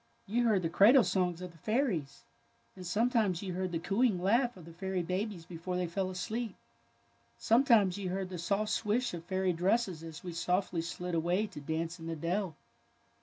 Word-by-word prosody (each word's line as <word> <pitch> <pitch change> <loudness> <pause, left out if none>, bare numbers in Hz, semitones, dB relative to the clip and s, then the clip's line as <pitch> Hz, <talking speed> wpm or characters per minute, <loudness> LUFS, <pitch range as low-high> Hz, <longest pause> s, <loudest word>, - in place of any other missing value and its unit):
" - - -28
'^ - - -8
You 240 +1 +3
heard 200 -5 +3
the - - +2
cradle 230 +9 +7
songs 180 -3 0
of 180 - -6
the 165 - -20
fairies, 215 - -1 0.5
and 185 -2 -8
sometimes 210 -2 +1
you 185 -2 -3
heard 185 0 -2
the 170 - -1
cooing 195 +4 +1
laugh 235 +5 +2
of 175 - -12
the 165 - -11
fairy 185 +1 -2
babies 185 0 -3
before 180 +2 -4
they 180 - 0
fell 185 +2 -2
asleep. 215 +4 -3 0.8
Sometimes 220 - +4
you 190 -2 -3
heard 190 0 -3
the 180 -2 -6
soft 205 +5 0
swish 230 +2 0
of 170 -1 -6
fairy 185 0 0
dresses 185 0 +1
as 165 0 -9
we 175 -2 -5
softly 180 0 0
slid 175 +1 -5
away 175 +5 +1
to 195 -7 -9
dance 165 +4 -3
in 165 - -7
the 165 - -3
dell." 170 +2 -2
185 Hz, 200 wpm, -32 LUFS, 170-210 Hz, 0.8 s, cradle